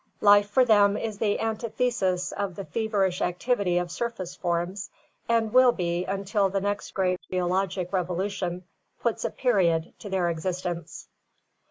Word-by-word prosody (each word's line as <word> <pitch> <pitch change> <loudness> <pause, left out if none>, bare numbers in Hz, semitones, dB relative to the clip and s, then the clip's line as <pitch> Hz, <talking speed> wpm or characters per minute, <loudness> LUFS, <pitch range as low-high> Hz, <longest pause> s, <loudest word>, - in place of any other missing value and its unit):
Life 205 0 +6
for 255 +5 +4
them 205 -3 +5
is 215 -3 -4
the 205 -2 +1
antithesis 225 -4 -1
of 200 -3 -3
the 195 - -6
feverish 200 -5 0
activity 180 0 0
of 175 -1 -1
surface 225 -7 -4
forms, 175 +3 -2 0.4
and 225 -1 +1
will 255 -1 +7
be 175 -4 -2
until 195 +1 0
the 195 +1 0
next 205 +1 -3
great 185 -1 +1
geologic 185 0 -1
revolution 180 0 -2 0.4
puts 235 -2 -1
a - - +1
period 175 -10 +1
to 205 - -8
their 180 -3 +1
existence. 170 0 -4
195 Hz, 145 wpm, -26 LUFS, 180-215 Hz, 0.4 s, will